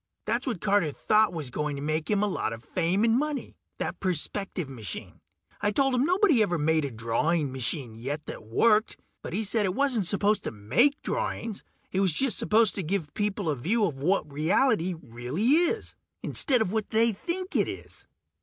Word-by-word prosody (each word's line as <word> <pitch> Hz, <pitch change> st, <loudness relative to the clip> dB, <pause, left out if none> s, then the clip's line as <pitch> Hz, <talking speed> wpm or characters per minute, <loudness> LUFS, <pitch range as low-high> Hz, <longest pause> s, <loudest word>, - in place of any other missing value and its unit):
That's 235 Hz, +5 st, -1 dB
what 230 Hz, -9 st, -2 dB
Carter 200 Hz, -7 st, +2 dB
thought 215 Hz, +8 st, +2 dB
was 155 Hz, -7 st, -6 dB
going 150 Hz, +2 st, -2 dB
to 140 Hz, -, -6 dB
make 155 Hz, +1 st, -2 dB
him 210 Hz, -1 st, +2 dB
a -, -, +2 dB
lot 195 Hz, -, -2 dB
of 115 Hz, +1 st, -9 dB
fame 180 Hz, -, 0 dB
and 230 Hz, +1 st, +4 dB
money, 300 Hz, -1 st, -3 dB, 0.2 s
that -, -, -4 dB
perspective 185 Hz, -1 st, -2 dB
machine. 115 Hz, -9 st, -8 dB, 0.4 s
I 205 Hz, -, +2 dB
told 270 Hz, +5 st, +2 dB
him 250 Hz, +2 st, +2 dB
nobody'd 360 Hz, -, +4 dB
ever 175 Hz, -5 st, +1 dB
made 160 Hz, 0 st, +2 dB
a -, -, -3 dB
drawing 130 Hz, +7 st, 0 dB
machine 130 Hz, -1 st, -3 dB
yet 140 Hz, +7 st, -5 dB
that -, -, -7 dB
worked, 215 Hz, -, +2 dB, 0.2 s
but -, -, -7 dB
he 205 Hz, +6 st, -1 dB
said 215 Hz, +1 st, +1 dB
it 185 Hz, -1 st, -1 dB
wasn't 255 Hz, -9 st, +2 dB
supposed 205 Hz, +2 st, +2 dB
to -, -, -2 dB
make 130 Hz, -, +2 dB
drawings. 230 Hz, -, -3 dB, 0.3 s
It 190 Hz, -, 0 dB
was 190 Hz, -4 st, +3 dB
just 265 Hz, -, +1 dB
supposed 225 Hz, -1 st, +3 dB
to -, -, 0 dB
give 165 Hz, -4 st, -2 dB
people 205 Hz, -3 st, -2 dB
a 150 Hz, -, +1 dB
view 205 Hz, -, +1 dB
of 140 Hz, -8 st, -4 dB
what 160 Hz, -2 st, 0 dB
reality 180 Hz, -, +2 dB
really 125 Hz, -, -4 dB
is, 345 Hz, +9 st, +3 dB, 0.3 s
instead 250 Hz, -6 st, +2 dB
of 180 Hz, -, -4 dB
what 220 Hz, -1 st, -2 dB
they 225 Hz, +1 st, +3 dB
think 355 Hz, -, -3 dB
it -, -, +3 dB
is. -, -, -9 dB
195 Hz, 195 wpm, -27 LUFS, 150-225 Hz, 0.4 s, and